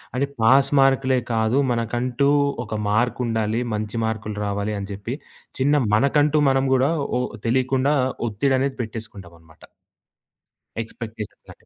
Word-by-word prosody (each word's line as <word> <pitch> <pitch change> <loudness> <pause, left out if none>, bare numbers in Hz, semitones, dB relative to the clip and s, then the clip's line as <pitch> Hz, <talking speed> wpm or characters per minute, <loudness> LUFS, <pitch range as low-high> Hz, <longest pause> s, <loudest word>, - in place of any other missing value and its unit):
అది 135 - +1 0.2
పాస్ 135 +4 +5
మార్క్‌లే 135 -1 +3 0.2
కాదు 110 +3 +1
మనకంటూ 120 +4 0 0.3
ఒక 110 -2 -7 0.2
మార్క్ 120 +5 +1
ఉండాలి. 115 0 0
మంచి 105 +1 -3
మార్క్‌లు 110 -1 -3
రావాలి. 100 +1 -2
అని 100 0 -6
చెప్పి 110 +6 -5 0.4
చిన్న 145 0 +3
మనకంటూ 145 +4 +3
మనం 135 0 +2
కూడా. 130 +4 +2 0.3
ఓ - - +1 0.3
తెలియకుండా 130 +3 +2 0.4
ఒత్తిడి 130 +6 +1
అనేది 135 0 -1
పెట్టేసుకుంటాం 110 -6 -8
అన్నమాట. 80 -1 -21 1.2
ఎక్స్‌పెక్టేషన్స్ 110 -2 -8
అని. - - -30
120 Hz, 130 wpm, -22 LUFS, 110-135 Hz, 1.2 s, పాస్